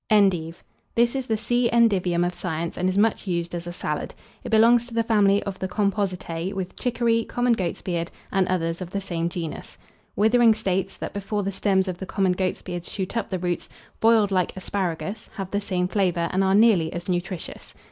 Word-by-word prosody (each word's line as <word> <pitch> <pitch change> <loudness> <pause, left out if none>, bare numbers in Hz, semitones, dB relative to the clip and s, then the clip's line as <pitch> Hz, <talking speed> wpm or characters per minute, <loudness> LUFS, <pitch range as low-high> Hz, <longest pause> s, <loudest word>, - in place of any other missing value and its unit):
ENDIVE. 180 -6 +2 0.3
This 235 0 +3
is 265 -2 -3
the 220 - +1
C. 240 +2 +1
endivium 185 -7 +3
of 175 - -1
science, 170 -2 -3
and 180 +1 0
is 185 - -1
much 215 0 +2
used 170 -1 -2
as 175 0 -4
a - - -4
salad. 175 - -3 0.3
It - - -5
belongs 230 +2 +5
to 235 - -9
the 230 - +2
family 205 -3 +3
of 195 -2 -5
the 190 - -2
Compositae, 190 -3 -1
with 190 -2 -4
Chicory, 235 -2 +1
common 245 +1 +1
Goats 185 -6 -2
beard, 170 -2 -2 0.2
and 195 -2 +2
others 165 -1 -1
of 180 - -5
the 200 - -2
same 170 -3 -2
genus. 170 -2 -6 0.4
Withering 225 +1 +5
states, 190 -2 -1
that - - -5
before 205 +1 -2
the 195 - -1
stems 190 -1 +1
of 180 -1 -4
the 190 - -6
common 195 -2 +1
Goats 185 0 -1
beard 175 -1 -5
shoot 190 +3 -5
up 230 -3 -1
the 185 - -1
roots, 175 -1 -3 0.3
boiled 220 -3 +4
like 185 -1 0
asparagus, 195 +2 -3
have 195 -3 -5
the 205 - 0
same 180 -3 -1
flavour, 180 -4 0
and 190 +1 +2
are 190 0 +3
nearly 205 -7 +4
as 175 0 -4
nutritious. 180 0 -4
190 Hz, 205 wpm, -24 LUFS, 180-215 Hz, 0.4 s, belongs